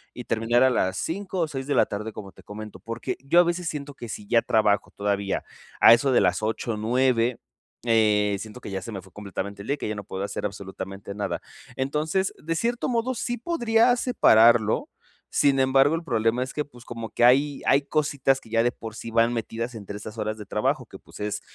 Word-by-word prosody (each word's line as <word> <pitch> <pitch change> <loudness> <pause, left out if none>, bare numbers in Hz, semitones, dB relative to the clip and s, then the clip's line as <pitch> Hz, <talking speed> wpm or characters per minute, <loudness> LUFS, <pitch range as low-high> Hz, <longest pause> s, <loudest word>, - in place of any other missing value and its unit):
y 125 - -6
terminar 115 +2 +2
a 130 - +5
las 95 -6 0
5, 185 +1 -3
o 165 - +1
6, 135 -3 -5
de 145 - 0
la - - +5
tarde, 105 +2 -5
como 100 -2 -9
te - - -18
comento, 105 +1 -9
porque 115 +1 -4
yo 160 +6 +4
a - - +4
veces 175 0 -1
siento 145 -1 -6
que 120 -3 -9
si 105 - -6
ya 115 +1 +4
trabajo, 105 -3 +2
todavía 100 -1 -2 0.4
a - - +9
eso 135 +4 +3
de 125 - +4
las 90 +2 +2
8, 110 +1 -2
9, 120 +2 +1 0.5
eh, 105 -3 +3
siento 110 +4 -8
que 110 - -8
ya 95 0 -3
se 115 - -7
me 95 -4 -6
fue 95 -2 -19
completamente 100 0 -6
el 100 - -10
día, 140 - +1
y - - -18
que - - -4
ya - - -1
no 105 - -6
puedo 95 0 -5
hacer 100 - -4
absolutamente 100 0 -6
nada. 105 0 -3 0.3
Entonces, 155 +8 -1
de 165 +2 -1
cierto 235 +8 -1
modo, 240 +1 0
sí 245 0 -3
podría 240 -4 +2
separarlo. 115 - +4 0.5
Sin 140 -1 +4
embargo, 135 +3 +4
el 165 - -4
problema 115 -3 +1
es 130 - -7
que, 150 - -1
pues, 125 -5 -17
como 115 -2 -6
que 120 - +2
hay 140 +3 +3
hay 140 - +4
cositas 140 -2 +1
que 115 - -18
ya 115 0 +3
de 120 +1 +2
por 115 -2 -9
sí 115 - -7
van 115 +1 +3
metidas 115 +1 -4
entre 100 -2 -7
estas 105 +2 -9
horas 110 0 -2
de 105 - -8
trabajo, 105 +1 -1
que, - - -13
pues, - - -15
es, 105 0 -3
115 Hz, 225 wpm, -25 LUFS, 105-140 Hz, 0.5 s, a